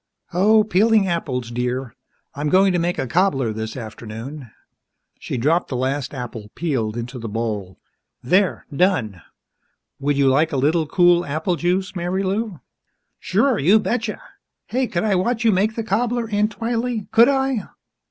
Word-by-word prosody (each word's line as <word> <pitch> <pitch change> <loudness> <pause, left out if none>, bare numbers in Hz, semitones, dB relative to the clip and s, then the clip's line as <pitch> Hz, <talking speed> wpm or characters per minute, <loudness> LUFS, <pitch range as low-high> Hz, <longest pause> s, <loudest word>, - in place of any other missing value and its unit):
"Oh, 215 +5 +5
peeling 215 +1 +3
apples, 130 -9 -2
dear. 125 0 -2 0.4
I'm 145 +1 -2
going 190 +3 +4
to 175 - +1
make 175 +2 -1
a 135 - -1
cobbler 135 - +1
this 110 +2 -5
afternoon." 115 +4 -8 0.7
She - - -4
dropped 155 +9 +1
the 130 - -4
last 130 +1 -1
apple, 115 -4 -7
peeled, 120 -10 -2
into 125 +2 -5
the 115 -1 -5
bowl. 105 -4 -3 0.5
"There, 185 +9 +2
done. 130 - +1 0.8
Would 140 0 0
you 140 -1 +3
like 145 +5 +3
a 140 - -1
little 155 +4 +2
cool 175 +1 +4
apple 160 +4 -1
juice, 180 +3 -1
Marilou?" 190 +2 -2 0.6
"Sure 220 +6 +1
you 185 +10 +5
betcha! 225 0 -2 0.5
Hey, 255 +1 -1
could 175 - -2
I 215 -2 +2
watch 225 +5 0
you 225 - +6
make 210 +3 +1
the 225 - -2
cobbler, 235 +3 0
Aunt 210 +1 +1
Twylee, 230 -1 -2
could 235 +3 +6
I? 270 -3 +1
175 Hz, 155 wpm, -21 LUFS, 130-210 Hz, 0.8 s, you